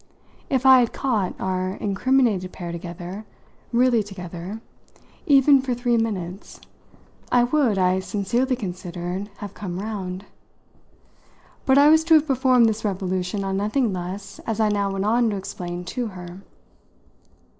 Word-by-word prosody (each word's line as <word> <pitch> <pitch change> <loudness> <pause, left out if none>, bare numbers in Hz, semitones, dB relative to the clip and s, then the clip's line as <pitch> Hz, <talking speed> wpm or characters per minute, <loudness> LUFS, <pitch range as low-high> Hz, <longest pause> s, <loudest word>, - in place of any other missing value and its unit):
If 265 -2 0
I 260 -1 +9
had 240 -2 +1
"caught" 220 -9 -1
our 185 0 -1
incriminated 205 -2 +1
pair 175 -2 -6
together 175 +3 -7 0.5
really 240 -1 +3
together 185 0 -7 0.7
even 275 -1 +6
for 255 -2 -2
three 240 0 +1
minutes, 195 -5 -3 0.7
I 245 -1 +5
would, 245 -4 +2
I 185 0 +2
sincerely 235 +7 -1
considered, 180 -2 -5
have 205 -1 -8
come 180 -4 -6
round. 195 -2 -5 1.4
But 265 0 +5
I 285 +1 +7
was 315 +1 +5
to 330 -1 +6
have 310 -1 +4
performed 255 -4 +4
this 220 0 -2
revolution 190 -1 -2
on 195 0 -2
nothing 215 +2 0
less, 185 +2 -6
as 225 -1 -2
I 215 -1 +3
now 200 -1 0
went 195 0 -2
on 230 +2 +3
to 205 - -2
explain 175 -2 -6
to 240 +7 -3
her. 180 -2 -9
205 Hz, 145 wpm, -23 LUFS, 185-245 Hz, 1.4 s, I